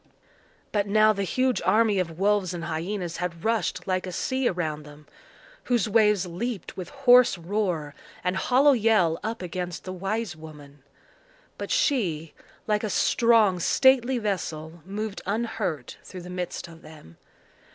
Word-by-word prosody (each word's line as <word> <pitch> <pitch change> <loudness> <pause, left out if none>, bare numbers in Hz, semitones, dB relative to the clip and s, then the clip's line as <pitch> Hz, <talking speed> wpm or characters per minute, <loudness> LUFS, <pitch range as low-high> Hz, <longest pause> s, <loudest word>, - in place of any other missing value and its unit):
But 205 -1 0
now 215 +1 +4
the 200 - -3
huge 255 +6 0
army 215 -3 +3
of 165 -3 -3
wolves 195 -2 +1
and 170 - -5
hyenas 170 +2 -3
had 170 -1 -4
rushed 210 -5 0
like 185 0 -1
a - - -5
sea 260 +7 -1
around 160 -4 -2
them, 150 0 -14 0.6
whose 240 -5 +1
waves 210 -3 +3
leaped 195 +5 -5
with 185 -2 -6
hoarse 250 -6 +5
roar 170 -5 -2 0.3
and 180 +1 0
hollow 260 +8 +4
yell 215 -9 +3
up 225 -2 -4
against 180 0 -5
the 185 - -6
wise 195 +1 -3
woman. 150 -3 -13 0.8
But - - -5
she, 190 - 0 0.3
like 210 0 0
a 215 - -1
strong 220 -3 +3
stately 260 +6 +3
vessel, 170 -6 -4
moved 205 +1 -4
unhurt 210 - -3
through 185 - -9
the 180 - -9
midst 180 -1 -4
of 165 -1 -14
them. 150 - -14
190 Hz, 150 wpm, -26 LUFS, 170-220 Hz, 0.8 s, hoarse